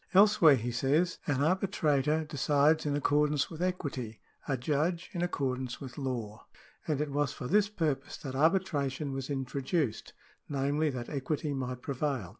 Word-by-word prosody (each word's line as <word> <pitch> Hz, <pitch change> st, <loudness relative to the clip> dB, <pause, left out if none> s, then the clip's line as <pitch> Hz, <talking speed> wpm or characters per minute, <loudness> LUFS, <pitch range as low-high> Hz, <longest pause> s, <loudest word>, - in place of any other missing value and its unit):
Elsewhere 195 Hz, -7 st, +7 dB
he 120 Hz, 0 st, -3 dB
says: 145 Hz, +9 st, +1 dB
" -, -, -23 dB
An 145 Hz, -, +2 dB
arbi 185 Hz, +6 st, +2 dB
trator 155 Hz, -3 st, +1 dB
decides 150 Hz, +2 st, +2 dB
in 145 Hz, -, +1 dB
accordance 145 Hz, +1 st, +2 dB
with 165 Hz, 0 st, -7 dB
equity, 140 Hz, -11 st, -3 dB, 0.3 s
a 135 Hz, -, 0 dB
judge 155 Hz, +6 st, -1 dB
in 175 Hz, -, -2 dB
accord 135 Hz, -7 st, -1 dB
ance 125 Hz, -2 st, -5 dB
with 130 Hz, -2 st, -8 dB
law: 120 Hz, -6 st, -4 dB, 0.4 s
and 150 Hz, -3 st, 0 dB
it 150 Hz, -1 st, -1 dB
was 145 Hz, 0 st, 0 dB
for -, -, -7 dB
this 205 Hz, +4 st, +3 dB
purpose 150 Hz, -8 st, -2 dB
that 135 Hz, -3 st, -7 dB
arbitration 145 Hz, -3 st, +1 dB
was 135 Hz, 0 st, -4 dB
introduced, 135 Hz, -1 st, -2 dB, 0.4 s
namely, 145 Hz, +2 st, +1 dB
that 125 Hz, -3 st, -5 dB
equity 150 Hz, +1 st, -2 dB
might 125 Hz, -2 st, -4 dB
prevail." 135 Hz, -, -2 dB
145 Hz, 165 wpm, -31 LUFS, 135-160 Hz, 0.4 s, Elsewhere